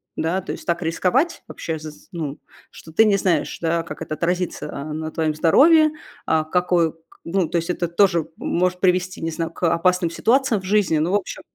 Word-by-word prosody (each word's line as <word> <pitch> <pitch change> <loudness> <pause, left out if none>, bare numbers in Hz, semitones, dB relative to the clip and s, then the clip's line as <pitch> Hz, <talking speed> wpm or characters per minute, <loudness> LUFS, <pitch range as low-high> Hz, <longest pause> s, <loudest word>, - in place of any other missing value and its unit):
да? 170 +4 -1
То 190 - -6
есть, - - -8
так 170 0 0
рисковать 185 - 0
вообще, 160 -1 -5
з 155 0 -7
з 150 - -19
ну, 155 -6 -4 0.3
что 160 - -13
ты 220 - +6
не 205 -2 +3
знаешь, 185 -3 0
да, 165 0 +1
как 165 - -9
это 155 - -5
отразится, 180 +2 -2
э, 140 - -6
на 155 +1 -4
твоём 155 -1 0
здоровье, 310 - +5 0.4
а 160 -1 +2
какой 175 0 +1
к - - -28 0.3
ну 175 0 0
то - - -5
есть, 170 +1 -1
это 175 -1 -2
тоже 170 -2 +2
может 180 +1 0
привести, 185 0 +1
не 165 0 -2
знаю, 165 0 -3
к 170 - -1
опасным 180 0 +1
ситуациям 235 +1 +2
в - - -12
жизни. 190 -5 +2
Ну, 160 +4 0
в - - +4
общем, 205 -3 -3
175 Hz, 215 wpm, -22 LUFS, 160-185 Hz, 0.4 s, ты